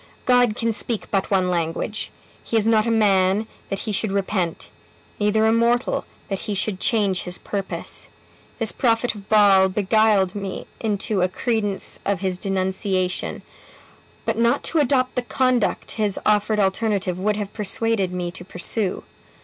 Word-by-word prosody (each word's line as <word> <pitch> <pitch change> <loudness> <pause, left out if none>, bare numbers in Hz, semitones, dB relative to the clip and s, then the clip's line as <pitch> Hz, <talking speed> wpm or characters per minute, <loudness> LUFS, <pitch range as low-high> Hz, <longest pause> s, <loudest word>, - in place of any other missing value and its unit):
God 245 -3 +4
can 230 0 0
speak 225 0 -2
but 195 -2 0
one 185 -2 +2
language. 170 +5 -2 0.3
He 230 - 0
is 215 - +2
not 225 0 +3
a - - +2
man, 200 -2 +3 0.2
that 195 - -2
he 220 - -3
should 205 0 -1
repent; 190 -3 -2 0.5
neither 210 +1 +2
a 220 - +4
mortal, 235 +2 +1 0.2
that 195 -1 -3
he 210 -2 -3
should 190 0 -1
change 205 -7 +2
his 180 0 -5
purpose. 195 -2 -4 0.5
This - - +1
prophet 230 -1 +1
of 205 -2 -12
Baal 200 -3 +6
beguiled 205 -1 +2
me 195 -2 -5
into 210 -2 -1
a 180 - +2
credence 210 -1 -1
of 200 -2 -1
his 185 -2 -1
denunciation; 190 -1 -1 0.8
but - - -1
not 235 +4 +2
to 325 - +1
adopt 255 -2 +2
the 250 - 0
conduct 250 -2 0
his 210 -3 -1
offered 210 0 +2
alternative 195 -2 0
would 210 +2 +1
have 205 -1 -5
persuaded 210 -2 0
me 180 -1 -3
to 180 0 -8
pursue. 190 +2 -1
205 Hz, 155 wpm, -22 LUFS, 190-225 Hz, 0.8 s, Baal